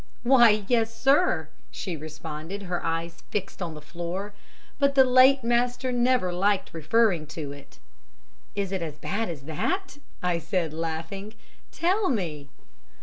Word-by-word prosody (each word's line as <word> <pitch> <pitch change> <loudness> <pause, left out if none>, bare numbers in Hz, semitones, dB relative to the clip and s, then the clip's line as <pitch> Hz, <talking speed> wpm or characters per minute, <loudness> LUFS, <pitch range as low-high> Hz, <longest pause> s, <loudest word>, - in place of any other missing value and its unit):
"'Why, 235 -5 +5
yes, 230 -2 +2
sir!' 285 +7 +3 0.2
she 180 -4 -5
responded, 155 +4 -7
her 175 -2 -3
eyes 165 0 -3
fixed 195 -1 -4
on 165 -3 -4
the 150 - -9
floor, 175 +6 -5 0.5
'but 280 -1 +3
the 265 - +8
late 260 +1 +6
master 245 +2 +1
never 245 -6 +2
liked 195 +2 +1
referring 170 0 +2
to 150 -2 -6
it.' 140 -1 -13 0.8
"'Is 200 -2 -2
it 190 -2 -2
as 155 -3 -5
bad 200 +7 -2
as 150 -5 -6
that?' 290 - -2 0.2
I 175 -2 +1
said, 170 -1 -1
laughing. 165 +6 -4 0.4
'Tell 375 +4 +1
me!' 160 - -2
195 Hz, 145 wpm, -26 LUFS, 165-245 Hz, 0.8 s, the